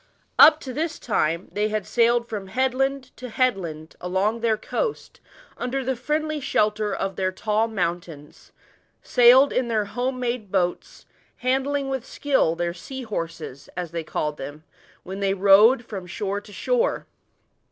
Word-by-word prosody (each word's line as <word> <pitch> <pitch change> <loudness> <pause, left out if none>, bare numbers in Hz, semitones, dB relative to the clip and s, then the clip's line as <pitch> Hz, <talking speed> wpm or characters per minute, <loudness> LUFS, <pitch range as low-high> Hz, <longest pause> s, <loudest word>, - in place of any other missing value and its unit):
Up 310 0 +9
to 260 - -6
this 320 +2 -2
time 170 -5 -1
they 210 +1 0
had 215 -2 -2
sailed 235 0 +2
from 205 -4 -5
headland 265 +4 -1
to 250 - -7
headland 190 -11 -1
along 190 +5 0
their 225 -2 +1
coast, 445 - -4 0.4
under 255 +2 -2
the 265 0 0
friendly 305 +5 -2
shelter 215 -5 0
of 195 -1 -3
their 185 -1 0
tall 215 +3 0
mountains 170 -7 -5 0.5
sailed 250 +3 +6
in 255 -1 +1
their 220 -3 0
home 250 +4 -3
made 235 -5 -3
boats, 180 -2 -2 0.4
handling 270 +2 +1
with 265 -3 -3
skill 270 - +1
their 170 0 -2
"sea 260 +9 -8
hor^es," 165 - -6
as 175 -3 -4
they 170 -1 -3
called 150 -1 -3
them, 145 +3 -8 0.4
when 190 +2 -7
they 195 -1 +1
rode 205 +6 +6
from 190 -5 -7
shore 200 +1 -3
to 205 - -15
shore. - - 0
215 Hz, 150 wpm, -24 LUFS, 185-255 Hz, 0.5 s, Up